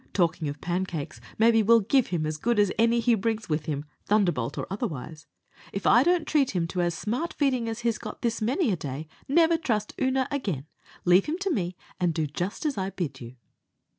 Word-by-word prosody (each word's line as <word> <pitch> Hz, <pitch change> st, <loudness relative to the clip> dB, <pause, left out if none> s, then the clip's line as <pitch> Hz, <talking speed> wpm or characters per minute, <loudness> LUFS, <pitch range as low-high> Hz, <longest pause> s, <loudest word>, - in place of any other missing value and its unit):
Talking 165 Hz, -4 st, +1 dB
of 145 Hz, 0 st, -6 dB
pancakes, 175 Hz, -4 st, -3 dB, 0.2 s
maybe 225 Hz, 0 st, +5 dB
we'll 230 Hz, +2 st, +5 dB
give 250 Hz, +5 st, +2 dB
him 170 Hz, -4 st, -1 dB
as 155 Hz, 0 st, -2 dB
good 235 Hz, +7 st, 0 dB
as 205 Hz, -2 st, +4 dB
any 230 Hz, +1 st, +4 dB
he 235 Hz, +1 st, +3 dB
brings 220 Hz, +1 st, -1 dB
with 150 Hz, 0 st, -1 dB
him 145 Hz, -1 st, -2 dB, 0.2 s
thunderbolt 180 Hz, -, +1 dB
or -, -, -2 dB
otherwise. 160 Hz, -, -5 dB, 0.4 s
If 195 Hz, -, -5 dB
I 240 Hz, -, +6 dB
don't 345 Hz, +2 st, +2 dB
treat 275 Hz, -9 st, +2 dB
him 170 Hz, -2 st, +1 dB
to 180 Hz, -, -1 dB
as 175 Hz, -1 st, 0 dB
smart 250 Hz, +11 st, -2 dB
feeding 255 Hz, -5 st, +1 dB
as 225 Hz, +1 st, -4 dB
he's 230 Hz, -2 st, 0 dB
got -, -, -8 dB
this 230 Hz, -1 st, 0 dB
many 255 Hz, -, +1 dB
a -, -, +2 dB
day, 145 Hz, 0 st, -6 dB, 0.2 s
never 330 Hz, +3 st, +4 dB
trust 215 Hz, -9 st, -1 dB
Oonagh 260 Hz, 0 st, +2 dB
again. 195 Hz, -, -2 dB, 0.4 s
Leave 180 Hz, +2 st, +5 dB
him 315 Hz, +3 st, -1 dB
to 395 Hz, -1 st, 0 dB
me, 180 Hz, -, -1 dB, 0.2 s
and 175 Hz, -3 st, +1 dB
do 160 Hz, -, +1 dB
just 175 Hz, -, -4 dB
as 285 Hz, -8 st, 0 dB
I 190 Hz, 0 st, -1 dB
bid 150 Hz, -9 st, -4 dB
you." 120 Hz, +1 st, -9 dB
205 Hz, 210 wpm, -27 LUFS, 165-240 Hz, 0.4 s, I